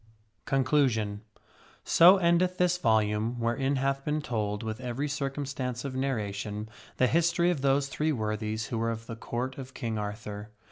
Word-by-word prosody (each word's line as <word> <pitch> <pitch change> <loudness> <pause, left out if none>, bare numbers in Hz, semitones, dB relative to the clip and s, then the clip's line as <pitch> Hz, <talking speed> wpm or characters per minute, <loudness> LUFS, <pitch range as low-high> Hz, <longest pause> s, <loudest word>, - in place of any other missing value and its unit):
x 110 - -31 0.4
4 135 - +2
CONCLUSION 125 -7 +1 0.6
So 180 +4 +7
endeth 180 +1 +2
this 180 0 +2
volume 110 -1 +1
wherein 135 +4 0
hath 135 +1 0
been 150 +1 0
told, 105 -6 -2
with 110 +2 -4
every 125 +4 -2
circumstance 135 -3 -3
of 135 - -4
narration, 105 -5 -3 0.3
the 130 - +4
history 170 +4 +3
of 155 -6 -2
those 140 0 +2
Three 155 +3 -1
Worthies 110 -2 -2
who 115 - -2
were 115 0 0
of 115 0 -4
the 115 - -6
Court 125 +4 -4
of 130 -1 -9
King 115 -2 -3
Arthur. 105 0 -6
125 Hz, 170 wpm, -29 LUFS, 110-140 Hz, 0.6 s, So